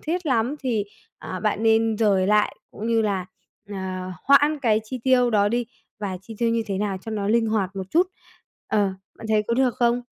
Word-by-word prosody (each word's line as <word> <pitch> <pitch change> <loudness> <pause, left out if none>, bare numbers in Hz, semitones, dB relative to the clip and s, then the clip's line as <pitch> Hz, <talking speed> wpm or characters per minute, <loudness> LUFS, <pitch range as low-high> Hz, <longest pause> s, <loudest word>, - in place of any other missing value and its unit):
thiết 345 +2 -3
lắm 250 0 +1
thì, 230 -6 0 0.3
à, 185 - -6
bạn 215 0 0
nên 225 -1 +3
dời 195 -4 +3
lại, 210 +1 +2
cũng 215 - -6
như 230 -1 +2
là, 195 -4 -1 0.4
ờ, 205 - -7 0.5
hoãn 290 +2 +5
cái 220 -5 +2
chi 255 +3 -6
tiêu 250 -2 +4
đó 205 -1 +3
đi 240 +1 -1 0.3
và 195 -3 -3
chi 220 +3 -10
tiêu 235 -1 +2
như 230 0 +1
thế 195 -3 -2
nào 200 -2 -1
cho 225 - -8
nó 205 -2 -2
linh 225 +1 +3
hoạt 200 -3 -1
một 190 - -3
chút. 350 +2 +4 0.6
Ờ, 215 - +1 0.4
bạn 225 - -8
thấy 215 -1 +3
có 235 - +2
được 250 -2 +2
không? 240 0 +1
225 Hz, 215 wpm, -24 LUFS, 205-245 Hz, 0.6 s, hoãn